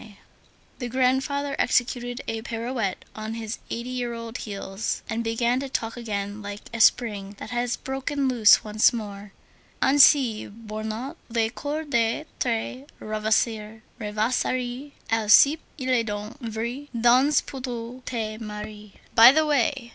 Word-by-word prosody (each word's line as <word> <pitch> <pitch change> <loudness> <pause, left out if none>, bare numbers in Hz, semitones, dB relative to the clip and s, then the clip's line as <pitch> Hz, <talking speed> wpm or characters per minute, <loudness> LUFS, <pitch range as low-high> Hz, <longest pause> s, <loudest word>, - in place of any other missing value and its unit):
_" 215 -3 -14 0.6
The 245 -2 -4
grandfather 265 +3 +1
executed 245 0 0
a 225 0 -3
pirouette 230 -3 -3
on 220 +1 -5
his 225 -1 -5
eighty 235 +2 -4
year 245 -2 -3
old 230 +1 -6
heels, 200 0 -4
and 225 +1 -2
began 235 +2 +1
to 275 0 -5
talk 225 -3 -2
again 205 -3 -4
like 205 0 -7
a 230 - -1
spring 205 -4 +3
that - - -8
has 240 0 -1
broken 270 +1 -2
loose 235 -5 +6
once 215 0 +4
more: 205 -3 -7 0.5
"Ainsi, 270 -4 +5
bornant 220 +6 -6
les 225 -1 0
cours 295 +5 -4
de 235 +2 +1
tes 250 +2 -2
rêvasseries, 220 +4 -2 0.2
Alcippe, 225 +8 +5 0.2
il 260 -3 -4
est 235 -3 +2
donc 210 +5 -5
vrai, 235 +4 -4
dans 255 +5 +5
peu 270 - -7
tu 245 -1 -6
te 220 -3 -4
maries."63 210 0 -8 0.2
"By 230 +2 +10
the 315 +2 +3
way!" 270 -3 +1
230 Hz, 140 wpm, -25 LUFS, 215-255 Hz, 0.6 s, By